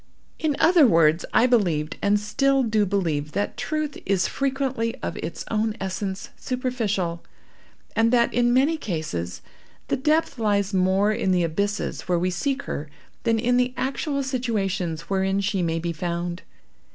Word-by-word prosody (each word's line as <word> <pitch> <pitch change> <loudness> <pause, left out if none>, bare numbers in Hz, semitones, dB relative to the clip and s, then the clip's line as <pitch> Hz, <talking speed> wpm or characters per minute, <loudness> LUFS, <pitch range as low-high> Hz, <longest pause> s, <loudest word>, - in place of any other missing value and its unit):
In 310 -3 0
other 335 -5 +6
words, 165 -3 +4
I 235 - +5
believed, 170 -10 +1
and 205 +1 +3
still 265 +6 +2
do 215 -3 +2
believe, 160 -7 -1
that 205 - -1
truth, 295 +5 -3
is 195 -2 +1
frequently 265 -4 -1
of - - -3
its - - -5
own 220 0 0
essence, 190 0 -4
superficial, 220 -9 -2 0.7
and 225 0 +3
that, 235 -1 +3
in 240 0 +3
many 275 +6 +3
cases, 155 - -4 0.5
the - - +1
depth 300 0 +1
lies 205 -2 +1
more 190 +2 +3
in 210 - 0
the 180 -1 +3
abysses 200 +6 -2
where 175 - +3
we 180 +2 0
seek 275 +9 -1
her, 150 +1 -5 0.4
than 225 -1 +3
in 245 +2 +2
the 250 0 +1
actual 275 +1 -1
situations 205 - -1
wherein 195 +1 0
she 200 -1 0
may 165 -1 0
be 170 +1 -2
found. 170 +1 -3
205 Hz, 155 wpm, -24 LUFS, 180-250 Hz, 0.7 s, other